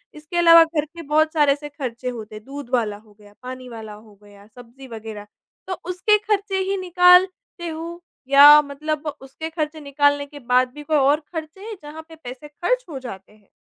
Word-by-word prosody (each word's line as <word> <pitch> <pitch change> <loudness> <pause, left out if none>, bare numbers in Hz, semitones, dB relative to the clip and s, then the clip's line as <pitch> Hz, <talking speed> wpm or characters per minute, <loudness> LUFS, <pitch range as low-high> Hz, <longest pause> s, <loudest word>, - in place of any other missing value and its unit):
इसके 305 +3 -7
अलावा 335 -1 +8
घर 320 -2 -2
के 335 +3 -12
बहुत 310 +1 +2
सारे 295 -3 +4
एसे 295 +1 -8
खर्चे 255 -4 -5
होते 220 -3 -8
हैं 215 - -10
दूध 280 -1 -9
वाला 220 -4 0
हो 210 0 -21
गया, 205 -1 -18
पानी 255 0 -8
वाला 220 -2 -9
हो 210 0 -16
गया, 205 -1 -17
सब्जी 245 +3 -15
वग़ैरह 220 -2 -9 0.4
तो 375 - -3 0.2
उसके 365 +4 +2
खर्चे 405 -2 -1
ही 395 - 0
निकालते 360 +2 +3
हो 335 +2 -7 0.3
या 280 +1 +8 0.2
मतलब 300 +2 -5
उसके 270 +4 -8
खर्चे 315 -1 -4
निकालने 285 0 +1
के 290 0 -13
बाद 255 0 +4
भी 295 +1 -10
कोई 305 +1 +1
और 285 +2 +3
खर्चे 320 +3 -7
हैं 445 - -6
जहाँ 300 +2 -9
पे 320 - -12
पैसे 255 +4 -9
खर्च 430 +12 -2
हो 280 -4 -6
जाते 195 -6 -10
हैं? 210 -2 -26
290 Hz, 200 wpm, -21 LUFS, 245-330 Hz, 0.4 s, अलावा